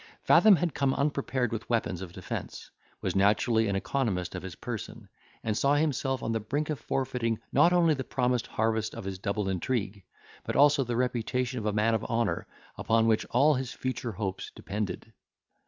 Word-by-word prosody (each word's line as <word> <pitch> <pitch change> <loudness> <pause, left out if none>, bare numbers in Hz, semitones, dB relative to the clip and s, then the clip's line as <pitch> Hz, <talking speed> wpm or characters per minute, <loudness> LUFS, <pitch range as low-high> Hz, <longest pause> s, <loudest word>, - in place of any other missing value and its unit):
Fathom 215 -3 +7
had 170 -2 -1
come 135 -1 +1
unprepared 140 -4 0
with 115 - -5
weapons 110 -6 0
of 95 -3 -7
defence, - - -7 0.3
was - - -1
naturally 110 +3 +3
an 100 - 0
economist 95 -5 -1
of - - -5
his 95 -3 -7
person, - - -7 0.4
and 110 -2 -1
saw 140 +5 +3
himself 135 -4 0
on 115 - -1
the 115 - 0
brink 145 +9 -2
of 150 - -3
forfeiting 125 -4 -1
not 150 +6 +5
only 170 -3 +4
the 135 -2 -3
promised 125 -2 0
harvest 110 0 -1
of 115 - -6
his 95 -1 -5
double 100 0 -2
intrigue, 100 +1 -2 0.4
but - - -4
also 145 0 +5
the 120 -1 -3
reputation 125 0 -1
of 110 - -3
a - - +2
man 105 +2 +2
of 110 -1 0
honour, 115 -2 -1 0.3
upon 115 0 +2
which 110 -1 +2
all 140 +6 +4
his 130 -2 -3
future 130 -3 -3
hopes 95 -2 -4
depended. 105 +2 -5
115 Hz, 185 wpm, -28 LUFS, 105-135 Hz, 0.4 s, Fathom